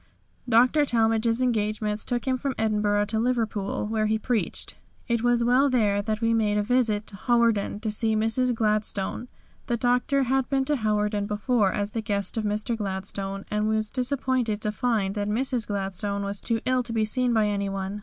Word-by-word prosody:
Dr. 250 Hz, +6 st, +4 dB
Talmage's 230 Hz, -1 st, +2 dB
engagements 215 Hz, -3 st, -1 dB
took 240 Hz, -1 st, -2 dB
him 260 Hz, -, +2 dB
from 265 Hz, +1 st, -3 dB
Edinburgh 210 Hz, -1 st, +1 dB
to 220 Hz, +1 st, -1 dB
Liverpool, 225 Hz, -5 st, -1 dB
where 215 Hz, 0 st, 0 dB
he 220 Hz, +1 st, +1 dB
preached. 225 Hz, 0 st, -2 dB, 0.3 s
It 235 Hz, -2 st, 0 dB
was 240 Hz, 0 st, +2 dB
while 255 Hz, +4 st, +4 dB
there 210 Hz, -5 st, +2 dB
that 215 Hz, +1 st, -3 dB
we 230 Hz, 0 st, +2 dB
made 210 Hz, -2 st, +1 dB
a 210 Hz, -, +1 dB
visit 220 Hz, -2 st, +1 dB
to 200 Hz, -, -6 dB
Hawarden 230 Hz, -2 st, +1 dB
to 220 Hz, -1 st, -1 dB
see 220 Hz, +1 st, 0 dB
Mrs. 225 Hz, +3 st, +1 dB
Gladstone. 215 Hz, 0 st, -1 dB, 0.4 s
The 240 Hz, -, 0 dB
Doctor 250 Hz, +3 st, +2 dB
had 265 Hz, 0 st, 0 dB
been 270 Hz, -1 st, +1 dB
to 295 Hz, +1 st, +1 dB
Hawarden 210 Hz, -2 st, 0 dB
before 210 Hz, -1 st, +1 dB
as 205 Hz, +1 st, -2 dB
the 225 Hz, -, -3 dB
guest 200 Hz, -2 st, -2 dB
of 225 Hz, -, -1 dB
Mr. 210 Hz, +3 st, -1 dB
Gladstone, 195 Hz, -1 st, -4 dB
and 210 Hz, 0 st, 0 dB
was 220 Hz, 0 st, 0 dB
disappointed 255 Hz, -4 st, 0 dB
to 210 Hz, -, -1 dB
find 210 Hz, -3 st, 0 dB
that 205 Hz, 0 st, -2 dB
Mrs. 245 Hz, +1 st, -1 dB
Gladstone 200 Hz, 0 st, -2 dB
was 200 Hz, 0 st, -3 dB
too 230 Hz, -2 st, 0 dB
ill 255 Hz, 0 st, +2 dB
to 235 Hz, -1 st, -6 dB
be 220 Hz, -1 st, +1 dB
seen 250 Hz, +3 st, +2 dB
by 220 Hz, -2 st, +3 dB
anyone. 200 Hz, -1 st, -2 dB
220 Hz, 185 wpm, -25 LUFS, 205-245 Hz, 0.4 s, Dr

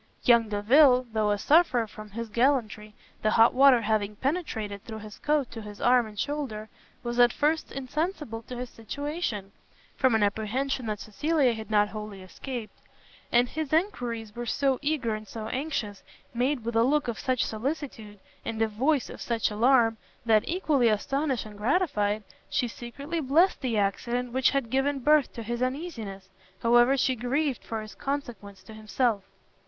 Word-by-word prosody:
Young 235 Hz, -2 st, +5 dB
Delvile, 250 Hz, +5 st, +5 dB
though 215 Hz, -1 st, +1 dB
a 205 Hz, -, +2 dB
sufferer 280 Hz, -, +3 dB
from 215 Hz, 0 st, -11 dB
his 230 Hz, +3 st, -5 dB
gallantry, 220 Hz, -3 st, 0 dB, 0.3 s
the 215 Hz, -, +2 dB
hot 225 Hz, +2 st, +5 dB
water 265 Hz, -2 st, +6 dB
having 210 Hz, -1 st, 0 dB
penetrated 220 Hz, -, -3 dB
through 220 Hz, -2 st, -7 dB
his 215 Hz, -1 st, -10 dB
coat 295 Hz, -4 st, 0 dB
to 225 Hz, -, -7 dB
his 210 Hz, -1 st, -10 dB
arm 245 Hz, -1 st, +4 dB
and 210 Hz, -1 st, -12 dB
shoulder, 255 Hz, -8 st, -3 dB, 0.3 s
was 240 Hz, 0 st, -3 dB
at 240 Hz, 0 st, +6 dB
first 310 Hz, +4 st, 0 dB
insensible 285 Hz, -, -3 dB
to 250 Hz, -, -6 dB
his 250 Hz, 0 st, -6 dB
situation, 230 Hz, -, -4 dB, 0.4 s
from 260 Hz, -4 st, +3 dB
an 220 Hz, -, +3 dB
apprehension 230 Hz, +5 st, -1 dB
that 210 Hz, -1 st, -2 dB
Cecilia 270 Hz, +4 st, +1 dB
had 220 Hz, -1 st, -7 dB
not 210 Hz, -1 st, +3 dB
wholly 210 Hz, -3 st, -7 dB
escaped; 235 Hz, +4 st, -7 dB, 0.6 s
and 240 Hz, +1 st, +4 dB
his 310 Hz, +1 st, -4 dB
enquiries 245 Hz, -, -1 dB
were 240 Hz, 0 st, -5 dB
so 270 Hz, +1 st, +1 dB
eager 290 Hz, -6 st, 0 dB
and 215 Hz, 0 st, -6 dB
so 220 Hz, +1 st, -6 dB
anxious, 255 Hz, -7 st, -3 dB, 0.3 s
made 250 Hz, 0 st, 0 dB
with 235 Hz, 0 st, -3 dB
a 225 Hz, -, +5 dB
look 290 Hz, +3 st, +2 dB
of 235 Hz, -3 st, -3 dB
such 255 Hz, -2 st, 0 dB
solicitude, 225 Hz, -3 st, -5 dB, 0.3 s
and 225 Hz, -1 st, -4 dB
a 225 Hz, -, +3 dB
voice 260 Hz, +6 st, +1 dB
of -, -, -10 dB
such 230 Hz, -2 st, 0 dB
alarm, 230 Hz, +1 st, +3 dB, 0.3 s
that, 220 Hz, -2 st, +4 dB
equally 305 Hz, -9 st, +2 dB
astonished 270 Hz, +5 st, -1 dB
and 210 Hz, -1 st, -11 dB
gratified, 215 Hz, -, +1 dB, 0.3 s
she 250 Hz, -, 0 dB
secretly 280 Hz, +8 st, -6 dB
blest 320 Hz, +6 st, +3 dB
the 245 Hz, -5 st, -1 dB
accident 235 Hz, +5 st, -1 dB
which 260 Hz, 0 st, +3 dB
had 275 Hz, -5 st, -1 dB
given 270 Hz, +2 st, +1 dB
birth 295 Hz, +2 st, +3 dB
to 230 Hz, -, -6 dB
his 240 Hz, +2 st, -4 dB
uneasiness, 255 Hz, -, -4 dB, 0.4 s
however 240 Hz, +3 st, +5 dB
she 260 Hz, 0 st, +2 dB
grieved 260 Hz, +4 st, -1 dB
for 220 Hz, -1 st, -4 dB
its 215 Hz, -2 st, -10 dB
consequence 230 Hz, -8 st, -5 dB
to 220 Hz, -, -12 dB
himself. 215 Hz, 0 st, -1 dB
240 Hz, 170 wpm, -27 LUFS, 215-275 Hz, 0.6 s, water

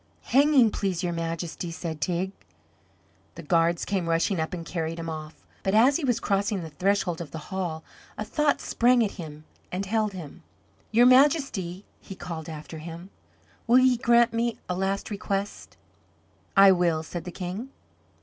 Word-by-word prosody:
"Hanging, 275 Hz, -4 st, +5 dB
please, 190 Hz, -3 st, -2 dB
your 175 Hz, -1 st, -1 dB
Majesty," 165 Hz, +1 st, -4 dB
said 165 Hz, -2 st, -6 dB
Teig. 180 Hz, +4 st, -1 dB, 1.0 s
The 170 Hz, -, -9 dB
guards 165 Hz, +2 st, +2 dB
came 185 Hz, -4 st, -1 dB
rushing 165 Hz, +3 st, +1 dB
up 160 Hz, -, -2 dB
and 170 Hz, -2 st, -5 dB
carried 165 Hz, -1 st, -3 dB
him 165 Hz, -1 st, -4 dB
off. 155 Hz, 0 st, -9 dB, 0.2 s
But 195 Hz, +2 st, 0 dB
as 255 Hz, +6 st, +5 dB
he 340 Hz, -, -6 dB
was 245 Hz, -4 st, +1 dB
crossing 200 Hz, -1 st, 0 dB
the 160 Hz, -, -8 dB
threshold 180 Hz, 0 st, 0 dB
of 165 Hz, -, -7 dB
the -, -, -7 dB, 0.2 s
hall 170 Hz, -4 st, -3 dB, 0.3 s
a 215 Hz, -, -3 dB
thought 295 Hz, +6 st, +1 dB
sprang 240 Hz, -1 st, +3 dB
at 200 Hz, -, -3 dB
him 155 Hz, -1 st, -9 dB, 0.3 s
and 190 Hz, +2 st, -2 dB
held 215 Hz, 0 st, 0 dB
him. 175 Hz, -2 st, -9 dB, 0.5 s
"Your 235 Hz, +2 st, +5 dB
Majesty," 255 Hz, -, +3 dB
he 195 Hz, -, -10 dB
called 165 Hz, -3 st, -7 dB
after 155 Hz, 0 st, -8 dB
him, 170 Hz, +4 st, -9 dB, 0.6 s
"will 240 Hz, +2 st, +6 dB
ye 255 Hz, -1 st, +5 dB
grant 235 Hz, 0 st, +4 dB
me 230 Hz, 0 st, 0 dB
a 180 Hz, -, -1 dB
last 195 Hz, +3 st, -2 dB
request?" 200 Hz, 0 st, -4 dB, 0.8 s
"I 195 Hz, 0 st, +9 dB
will," 170 Hz, -3 st, +2 dB
said 170 Hz, 0 st, -6 dB
the 180 Hz, -, -7 dB
King. 185 Hz, +8 st, -5 dB
185 Hz, 170 wpm, -26 LUFS, 165-220 Hz, 1.0 s, I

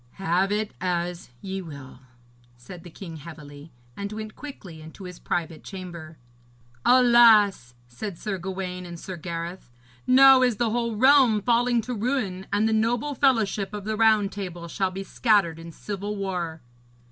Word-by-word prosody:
'Have 190 Hz, +1 st, 0 dB
it 210 Hz, 0 st, -1 dB
as 175 Hz, -2 st, -2 dB
ye 190 Hz, 0 st, -5 dB
will,' 140 Hz, -7 st, -11 dB, 0.6 s
said 125 Hz, +9 st, -11 dB
the 175 Hz, -, -11 dB
king 165 Hz, -1 st, -9 dB
heavily, 150 Hz, -1 st, -11 dB, 0.2 s
and 200 Hz, 0 st, -5 dB
went 215 Hz, 0 st, -7 dB
quickly 190 Hz, -, -10 dB
into 160 Hz, +5 st, -12 dB
his 180 Hz, -1 st, -9 dB
private 165 Hz, -2 st, -3 dB
chamber. 170 Hz, -5 st, -9 dB, 0.7 s
'Alas!' 230 Hz, -, +5 dB
said 165 Hz, -, -7 dB
Sir 195 Hz, 0 st, -4 dB
Gawaine 185 Hz, 0 st, -5 dB
and 170 Hz, -1 st, -9 dB
Sir 185 Hz, +1 st, -7 dB
Gareth, 170 Hz, -1 st, -6 dB, 0.4 s
'now 265 Hz, 0 st, +7 dB
is 250 Hz, -3 st, +3 dB
the 230 Hz, +1 st, 0 dB
whole 235 Hz, -1 st, -1 dB
realm 260 Hz, -2 st, +5 dB
falling 240 Hz, +2 st, +2 dB
to 250 Hz, -, -4 dB
ruin, 215 Hz, -5 st, -2 dB
and 205 Hz, +2 st, +2 dB
the 220 Hz, -, +1 dB
noble 230 Hz, +6 st, 0 dB
fellowship 215 Hz, -7 st, +1 dB
of 205 Hz, -, -6 dB
the 220 Hz, 0 st, -2 dB
Round 215 Hz, -2 st, +3 dB
Table 175 Hz, -4 st, -6 dB
shall 190 Hz, +3 st, -1 dB
be 190 Hz, +1 st, -6 dB
scattered 195 Hz, -6 st, +1 dB
in 165 Hz, 0 st, -9 dB
civil 205 Hz, +4 st, -5 dB
war.' 180 Hz, -5 st, -4 dB
195 Hz, 160 wpm, -25 LUFS, 170-220 Hz, 0.7 s, now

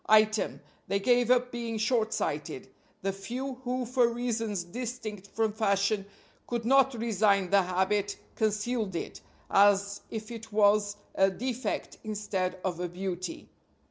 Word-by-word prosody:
Item: 215 Hz, 0 st, +4 dB, 0.3 s
they 200 Hz, -, +1 dB
gave 245 Hz, +3 st, +3 dB
up 250 Hz, 0 st, +3 dB
being 235 Hz, -2 st, -3 dB
shortsighted; 215 Hz, -, -1 dB, 0.4 s
the 195 Hz, 0 st, 0 dB
few 250 Hz, +7 st, -5 dB
who 250 Hz, 0 st, -1 dB
for 245 Hz, 0 st, +3 dB
reasons 230 Hz, -5 st, -1 dB
distinct 215 Hz, 0 st, -6 dB
from 220 Hz, +1 st, 0 dB
fashion 200 Hz, -1 st, +1 dB, 0.4 s
could 235 Hz, -2 st, -2 dB
not 270 Hz, +1 st, +5 dB
resign 205 Hz, -4 st, +2 dB
the 200 Hz, -1 st, +6 dB
habit 190 Hz, +3 st, 0 dB, 0.2 s
concealed 215 Hz, -1 st, 0 dB
it, -, -, -5 dB, 0.3 s
as 200 Hz, 0 st, +4 dB
if 220 Hz, 0 st, -6 dB
it 225 Hz, -1 st, -8 dB
was 205 Hz, 0 st, +3 dB, 0.2 s
a 195 Hz, 0 st, +4 dB
defect 250 Hz, +6 st, -3 dB
instead 195 Hz, -4 st, -2 dB
of 180 Hz, -2 st, -1 dB
a 180 Hz, 0 st, -2 dB
beauty. 180 Hz, 0 st, -4 dB
215 Hz, 135 wpm, -29 LUFS, 195-235 Hz, 0.4 s, the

